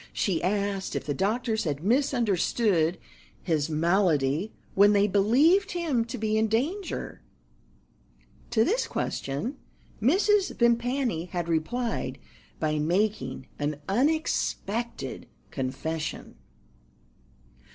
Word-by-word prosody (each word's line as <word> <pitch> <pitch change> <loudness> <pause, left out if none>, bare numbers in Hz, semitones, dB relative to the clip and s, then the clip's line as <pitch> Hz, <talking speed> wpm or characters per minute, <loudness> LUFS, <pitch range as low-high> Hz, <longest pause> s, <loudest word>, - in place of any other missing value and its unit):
She 185 -5 0
asked 200 +1 -1
if - - -3
the 145 - -1
doctors 220 - 0
had 145 -1 -2
misunderstood 215 - +2 0.5
his 155 -3 0
malady 165 0 +1 0.2
when 205 +1 +6
they 200 0 +4
believed 280 - +3
him 310 -10 0
to 240 +2 -6
be 215 -1 0
in 220 - +2
danger. 310 - -2 1.3
To 220 - +3
this 460 +9 +1
question 210 - -3 0.4
Mrs. 385 - +3
Vimpany 235 -5 +1
had 175 -1 -4
replied 205 +9 -1 0.4
by 155 -1 0
making 170 -5 0
an 145 0 -2
unexpected 240 -3 -1 0.2
confession. 150 +4 -4
205 Hz, 100 wpm, -27 LUFS, 165-245 Hz, 1.3 s, when